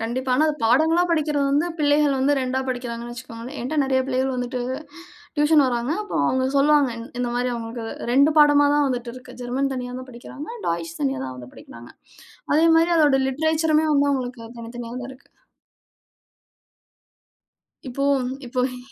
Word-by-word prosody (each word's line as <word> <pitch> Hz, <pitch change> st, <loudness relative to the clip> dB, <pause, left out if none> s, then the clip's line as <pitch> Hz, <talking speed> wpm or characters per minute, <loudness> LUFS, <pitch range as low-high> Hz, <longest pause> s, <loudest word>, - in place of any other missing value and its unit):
கண்டிப்பா. 250 Hz, +4 st, -3 dB
ஆனா, 305 Hz, -, +4 dB
அது 305 Hz, -, 0 dB
பாடங்களா 320 Hz, +8 st, +4 dB
படிக்கிறது 300 Hz, -3 st, +1 dB
வந்து 290 Hz, +4 st, +2 dB
பிள்ளைகள் 290 Hz, -1 st, +3 dB
வந்து 270 Hz, +2 st, +2 dB
2டா 260 Hz, 0 st, -1 dB
படிக்கிறாங்கன்னு 240 Hz, -2 st, -4 dB
வச்சுக்கோங்களேன். 240 Hz, +2 st, -9 dB
என்ட்ட 255 Hz, +6 st, -3 dB
நெறைய 265 Hz, -1 st, +1 dB
பிள்ளைகள் 260 Hz, 0 st, 0 dB
வந்துட்டு 250 Hz, 0 st, -3 dB, 0.8 s
ட்யூஷன் 295 Hz, -1 st, +4 dB
வராங்க. 245 Hz, +3 st, -1 dB
அப்ப 415 Hz, -, -11 dB
அவங்க 260 Hz, -, +1 dB
சொல்லுவாங்க 285 Hz, -1 st, +4 dB, 0.3 s
இந்த 245 Hz, -1 st, -1 dB
மாதிரி 245 Hz, +1 st, 0 dB
அவங்களுக்கு 230 Hz, 0 st, -6 dB, 0.3 s
2 280 Hz, +4 st, +5 dB
பாடமாதான் 290 Hz, -1 st, +5 dB
வந்துட்டு 245 Hz, -2 st, -3 dB
இருக்கு. 255 Hz, 0 st, -12 dB
ஜெர்மன் 265 Hz, +3 st, -1 dB
தனியா 250 Hz, -1 st, -5 dB
தான் 255 Hz, 0 st, -10 dB
படிக்கிறாங்க. 255 Hz, +4 st, -10 dB, 0.2 s
டாய்ச் 165 Hz, 0 st, -3 dB
தனியா 135 Hz, -2 st, -1 dB
தான் 130 Hz, -1 st, -6 dB
வந்து 125 Hz, 0 st, -11 dB
படிக்கிறாங்க. 115 Hz, +1 st, -13 dB, 0.6 s
அதே 320 Hz, +2 st, +4 dB
மாதிரி 330 Hz, +1 st, +3 dB
அதோட 295 Hz, -4 st, +4 dB
லிட்ரேச்சருமே 315 Hz, +2 st, +1 dB
வந்து 285 Hz, 0 st, +3 dB
அவங்களுக்கு 250 Hz, -3 st, -4 dB, 0.2 s
தனித்தனியா 235 Hz, 0 st, -7 dB
தான் 250 Hz, -, -7 dB
இருக்கு. 260 Hz, -, -19 dB, 2.6 s
இப்போ, 260 Hz, +2 st, -3 dB, 0.4 s
இப்போ 250 Hz, +1 st, -2 dB
இ 250 Hz, -1 st, -9 dB
260 Hz, 150 wpm, -23 LUFS, 240-290 Hz, 2.6 s, 2